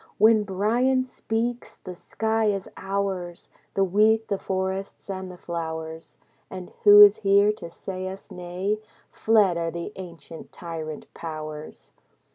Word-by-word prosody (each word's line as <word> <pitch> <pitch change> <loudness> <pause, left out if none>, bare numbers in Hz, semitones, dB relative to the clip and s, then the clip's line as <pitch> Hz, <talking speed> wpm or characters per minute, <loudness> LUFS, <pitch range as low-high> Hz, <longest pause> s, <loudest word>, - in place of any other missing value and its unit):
When 220 +1 +6
Bryan 235 +7 +1
speaks, 240 -1 -3
the 185 - -9
sky 220 +5 -1
is 200 -2 0
ours, 195 -3 -4 0.2
The 195 - +3
wheat, 215 +4 +3
the 200 - -1
forests, 190 +1 -3
and 190 -1 -5
the 180 - -10
flowers. 160 -1 -6 0.3
And 185 -1 -8
who 205 0 +10
is 205 0 +7
here 200 0 +4
to 170 - -8
say 185 +2 -6
us 190 +2 -9
nay? 185 +3 -3 0.3
Fled 210 -6 +3
are 165 0 -1
the 170 +4 -5
ancient 170 -3 -10
tyrant 160 -3 -7
powers. 155 -2 -8
190 Hz, 135 wpm, -25 LUFS, 170-210 Hz, 0.3 s, who